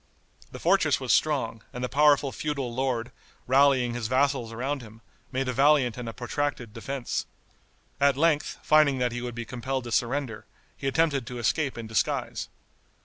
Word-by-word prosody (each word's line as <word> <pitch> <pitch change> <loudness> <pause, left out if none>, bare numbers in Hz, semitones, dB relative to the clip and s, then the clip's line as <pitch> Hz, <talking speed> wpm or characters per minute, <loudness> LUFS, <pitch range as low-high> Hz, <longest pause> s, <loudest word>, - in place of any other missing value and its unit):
The - - -8
fortress - - +3
was - - +1
strong, 130 -7 +1
and 125 - -6
the - - 0
powerful 145 0 +4
feudal 140 -5 -3
lord, 125 -2 -1 0.3
rallying 130 -2 +4
his 120 -2 -3
vassals 130 -2 +1
around 135 +4 -3
him, 110 -1 -13 0.3
made 135 0 -1
a 125 - -1
valiant 135 -2 +4
and 120 -2 -5
a - - -4
protracted 125 -1 -3
defense. 125 +2 -4 0.7
At 140 -1 +3
length, 155 -1 +1
finding 155 -3 +4
that 125 -1 0
he 120 +1 -4
would 120 -1 -5
be 120 -1 -5
compelled 130 +2 -3
to 120 - -7
surrender, 125 -2 -1 0.3
he 135 - -5
attempted 140 -4 +1
to 125 - -6
escape 135 +4 0
in 115 - -5
disguise. 110 0 -1
130 Hz, 170 wpm, -27 LUFS, 120-140 Hz, 0.7 s, powerful